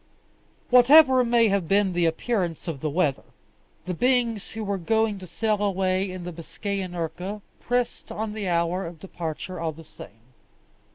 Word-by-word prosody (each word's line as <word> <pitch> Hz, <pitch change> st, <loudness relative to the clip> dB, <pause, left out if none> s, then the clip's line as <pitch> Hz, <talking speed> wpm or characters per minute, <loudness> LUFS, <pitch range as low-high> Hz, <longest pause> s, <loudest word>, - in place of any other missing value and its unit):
Whatever 260 Hz, +1 st, +7 dB
may 235 Hz, -2 st, +3 dB
have 195 Hz, -4 st, 0 dB
been 195 Hz, 0 st, +2 dB
the 175 Hz, -1 st, +2 dB
appearance 175 Hz, -1 st, -2 dB
of 160 Hz, -5 st, -4 dB
the 155 Hz, -, -2 dB
weather, 150 Hz, -3 st, 0 dB, 0.6 s
the 180 Hz, -, -3 dB
beings 235 Hz, 0 st, +1 dB
who 220 Hz, 0 st, -6 dB
were 200 Hz, -1 st, -2 dB
going 220 Hz, +3 st, +1 dB
to 185 Hz, -, -10 dB
sail 210 Hz, +5 st, -1 dB
away 190 Hz, -1 st, 0 dB
in 185 Hz, -1 st, -7 dB
the 175 Hz, 0 st, -6 dB
Biscayan 185 Hz, +3 st, -5 dB
urca 180 Hz, +5 st, -4 dB, 0.2 s
pressed 245 Hz, 0 st, -2 dB
on 215 Hz, 0 st, -4 dB
the 210 Hz, -3 st, -3 dB
hour 170 Hz, +2 st, 0 dB
of 165 Hz, -1 st, -10 dB
departure 175 Hz, 0 st, -6 dB
all 160 Hz, -1 st, -2 dB
the 165 Hz, +2 st, -12 dB
same. 115 Hz, -3 st, -15 dB
190 Hz, 165 wpm, -25 LUFS, 170-220 Hz, 0.6 s, Whatever